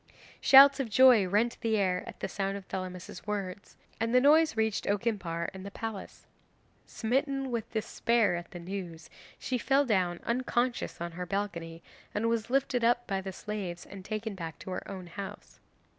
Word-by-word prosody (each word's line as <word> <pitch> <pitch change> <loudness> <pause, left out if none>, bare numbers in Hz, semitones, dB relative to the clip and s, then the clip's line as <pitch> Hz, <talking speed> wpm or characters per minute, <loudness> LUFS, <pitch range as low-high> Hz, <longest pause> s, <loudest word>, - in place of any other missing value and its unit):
'Shouts 275 +1 +8
of 260 -4 -1
joy 240 -3 +6
rent 215 +5 +1
the 220 -1 +1
air 185 -3 +1
at - - -10
the - - -1
sound 195 0 -2
of 195 - -10
Thelamis's 185 0 -6
words, 200 -2 -5 0.2
and 230 +2 0
the - - +8
noise 300 -1 +5
reached 220 -2 0
Okimpare 195 -6 -1
in 190 - -8
the 200 - -7
palace. 215 -1 -7 0.6
Smitten 270 +3 -1
with 235 -2 -3
despair 220 -2 +1
at 175 0 -6
the 180 - -9
news, 175 -2 -7 0.3
she 255 -2 -2
fell 275 +4 +3
down 180 -7 +1
unconscious 245 0 -1
on 170 0 -4
her 180 +2 -6
balcony, 170 -4 -4 0.3
and 215 +2 +1
was 230 -1 -1
lifted 255 -2 +1
up 240 +1 +3
by 195 -1 -2
the 190 0 -5
slaves 190 -3 -5
and 195 -1 -10
taken 215 +1 -4
back 165 -4 -6
to 185 - -8
her 185 - -5
own 190 -2 -7
house. 195 +3 -9
205 Hz, 175 wpm, -30 LUFS, 185-235 Hz, 0.6 s, Shouts